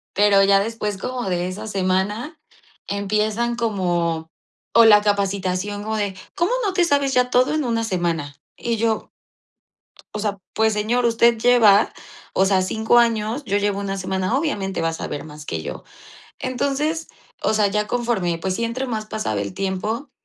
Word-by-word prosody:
Pero 200 -1 +5
ya 195 0 +5
después, 210 -1 -3
como 250 -1 -4
de 180 0 -1
esa 190 +4 -6
semana, 200 - -1 0.5
empiezan 215 +4 0
como 175 -7 -1 0.5
o 230 0 +8
la 210 -1 +7
capacitación 200 -1 -1
como 220 +1 -2
de: 205 -2 -2 0.2
"¿Cómo 345 +6 +1
no 395 -3 0
te 360 - +3
sabes 280 -3 +1
ya 250 -1 +3
todo 250 +3 +3
en 310 -1 0
una 230 -2 0
semana?". 170 -8 -2 0.2
Y 235 -1 -2
yo 225 0 -1 1.1
o 215 - -3
sea, 205 -1 -2 0.2
pues, 220 +1 +2
señor, 225 +4 0
usted 235 0 +4
lleva, 220 -4 +5 0.4
o 190 - +3
sea, 190 -1 +3
5 220 +5 +2
años, 230 +3 +1
yo 200 -3 +1
llevo 205 -1 0
una 195 -1 -3
semana; 190 +5 -1
obviamente, 205 - -2
va 165 - +1
a 165 - -2
saber 155 -2 -5
más 150 -1 -10
que 80 -1 -3
yo. - - -7 0.5
Entonces, 280 +5 -1 0.3
o - - +2
sea, 210 -1 +3
ya 210 +1 0
conforme, 220 -9 -1
pues, 185 +2 -2
sí, 230 - -1
entre 255 +3 -2
más 215 -3 -3
pasaba 210 - -2
el 100 0 -4
tiempo, 195 +7 -3
210 Hz, 170 wpm, -22 LUFS, 190-235 Hz, 1.1 s, o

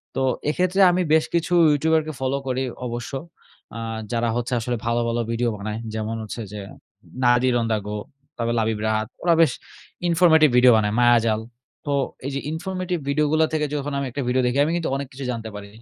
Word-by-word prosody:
তো - - -1 0.3
এক্ষেত্রে 185 +4 +1
আমি 180 +1 +1
বেশ 160 0 +4
কিছু 170 +1 0 0.2
ইউটিউবারকে 155 +1 +1
ফলো 130 +1 0
করি 130 0 -1 0.3
অবশ্য। 120 +2 -5 0.6
আ - - -5 0.3
যারা 115 0 0
হচ্ছে 120 +1 -2
আসলে 120 +1 -2
ভালো, 115 0 +1
ভালো 115 0 0
ভিডিও 120 +1 0
বানায়। 105 +2 -4
যেমন 110 +1 -3
হচ্ছে 110 +2 -6
যে 105 - -5 0.6
Nadir 120 +1 +4
On 115 - -1
The 110 - +2
Go, 105 - -3 0.4
তারপর 115 0 -1
লাবিব 110 -1 0
রাহাত। 110 0 0 0.2
ওরা 170 - +4
বেশ 160 -5 +5 0.6
informative 160 -3 +5
ভিডিও 125 0 +7
বানায়। 105 -1 +1
মায়াজাল। 115 -2 +4 0.4
তো 145 - -2 0.3
এই 140 - -2
যে - - -1
informative 180 +1 -3
ভিডিওগুলা 150 +2 +2
থেকে 155 -1 +1
যখন 145 0 -3
আমি 140 - -1
একটা 140 - -3
ভিডিও 130 +1 +2
দেখি, 125 +2 0
আমি 160 - -1
কিন্তু 170 - -2
অনেক 140 0 -3
কিছু 135 +1 -6
জানতে 115 -2 -5
পারি। 100 0 -8
130 Hz, 190 wpm, -23 LUFS, 115-155 Hz, 0.6 s, ভিডিও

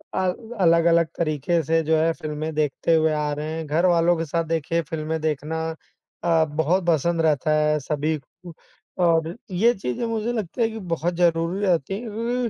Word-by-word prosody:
अल 185 -1 +1 0.3
अलग-अलग 170 -1 +4
तरीके 165 +1 0
से 165 +3 +2
जो 160 +1 +2
है 160 +1 +2
फ़िल्में 155 0 -5
देखते 150 +2 +1
हुए 160 0 +3
आ 150 -1 -1
रहे 150 +2 -4
हैं, 160 0 -4
घरवालों 170 +2 +3
के 165 - -2
साथ 165 +2 -1
देखिए 165 +1 0
फ़िल्में 160 0 -4
देखना 155 +1 -2 0.6
अ, 165 -2 +3
बहुत 160 +4 0
पसंद 170 +1 +2
रहता 155 -2 +1
है 150 0 +2
सभी 150 +2 -1
को। 170 +4 -14 0.5
और 165 -1 +2 0.2
ये 220 +7 +3
चीज़ें 190 - -3
मुझे 225 0 -2
लगता 215 -1 -3
है 225 - +3
कि 220 - -6
बहुत 175 -2 -2
ज़रूरी 170 +3 +1
रहती 180 +1 0
हैं 235 +2 -2
165 Hz, 175 wpm, -23 LUFS, 155-175 Hz, 0.6 s, अलग-अलग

